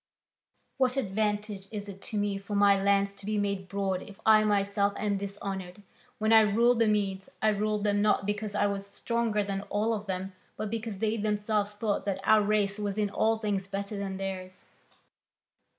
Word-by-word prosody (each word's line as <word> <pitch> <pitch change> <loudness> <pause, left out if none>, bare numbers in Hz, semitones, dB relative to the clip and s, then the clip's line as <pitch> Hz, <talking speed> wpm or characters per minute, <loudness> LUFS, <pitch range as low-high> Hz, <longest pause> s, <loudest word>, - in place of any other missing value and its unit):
What 260 -1 +2
advantage 210 -3 -1
is 205 -2 -5
it 195 -1 -9
to 215 - -3
me 205 -1 0
for 205 +1 -5
my 200 -1 +5
lands 200 0 +2
to 200 - -13
be 215 0 0
made 200 -2 -1
broad 195 -1 -1
if 200 - -12
I 215 -1 +7
myself 200 -1 +1
am 205 -1 0
dishonoured? 195 -1 -6 0.3
When 220 0 +2
I 220 - +9
ruled 230 +3 +3
the 230 - +4
Medes, 195 -2 0
I 220 - +3
ruled 210 0 0
them 205 -1 +2
not 210 -1 +2
because 205 0 -3
I 205 - +2
was 200 -1 -2
stronger 225 0 -1
than 195 -1 -3
all 215 +2 +1
of 210 -1 -4
them, 190 0 -3 0.2
but 215 -1 -3
because 225 -2 -4
they 220 +2 0
themselves 210 0 0
thought 205 -1 -1
that 195 -1 0
our 215 +1 +5
race 205 -1 +1
was 205 -1 -2
in 205 -2 0
all 225 +2 +2
things 205 -3 -2
better 200 +1 -4
than 195 -1 -4
theirs." 185 -1 -6
205 Hz, 190 wpm, -29 LUFS, 195-215 Hz, 0.3 s, I